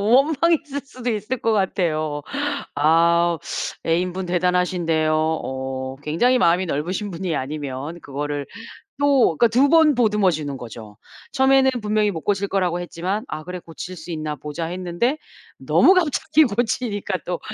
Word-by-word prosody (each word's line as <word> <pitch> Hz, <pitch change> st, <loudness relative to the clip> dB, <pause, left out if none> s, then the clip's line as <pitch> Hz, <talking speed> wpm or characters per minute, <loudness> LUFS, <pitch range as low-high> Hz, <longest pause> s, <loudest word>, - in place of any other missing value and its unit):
원망했을 300 Hz, 0 st, +2 dB
수도 255 Hz, -3 st, -5 dB
있을 215 Hz, +3 st, -2 dB
것 230 Hz, -, 0 dB
같아요. 155 Hz, -7 st, 0 dB, 0.5 s
아 170 Hz, +3 st, +3 dB, 0.5 s
애인 175 Hz, +2 st, +1 dB
분 185 Hz, 0 st, -4 dB
대단하신데요. 180 Hz, -3 st, +1 dB
어 130 Hz, -4 st, -2 dB
굉장히 240 Hz, -, +2 dB
마음이 180 Hz, -1 st, +3 dB
넓으신 180 Hz, +8 st, -2 dB
분이 175 Hz, -2 st, -3 dB
아니면 145 Hz, +3 st, -5 dB
그거를 145 Hz, +1 st, -4 dB, 0.5 s
또 275 Hz, -, +3 dB
그러니까 235 Hz, -, +5 dB
2 255 Hz, +5 st, +3 dB
번 320 Hz, -2 st, +5 dB
보듬어 210 Hz, -5 st, +3 dB
주는 150 Hz, -3 st, -4 dB
거죠. 110 Hz, -4 st, -10 dB, 0.3 s
처음에는 265 Hz, 0 st, +4 dB
분명히 210 Hz, 0 st, +1 dB
못 165 Hz, -4 st, -5 dB
고칠 200 Hz, +1 st, 0 dB
거라고 180 Hz, -3 st, 0 dB
했지만 180 Hz, +4 st, -3 dB
'아 155 Hz, -, -6 dB
그래 180 Hz, +2 st, -6 dB
고칠 175 Hz, +2 st, -8 dB
수 175 Hz, -, -8 dB
있나 155 Hz, -2 st, -3 dB
보자.' 150 Hz, +4 st, -5 dB
했는데 180 Hz, -, -1 dB, 0.4 s
너무 380 Hz, -, +4 dB
갑자기 315 Hz, -2 st, +3 dB
고치니까 220 Hz, -3 st, -1 dB
또 175 Hz, -1 st, -3 dB
180 Hz, 315 characters per minute, -22 LUFS, 155-225 Hz, 0.5 s, 그러니까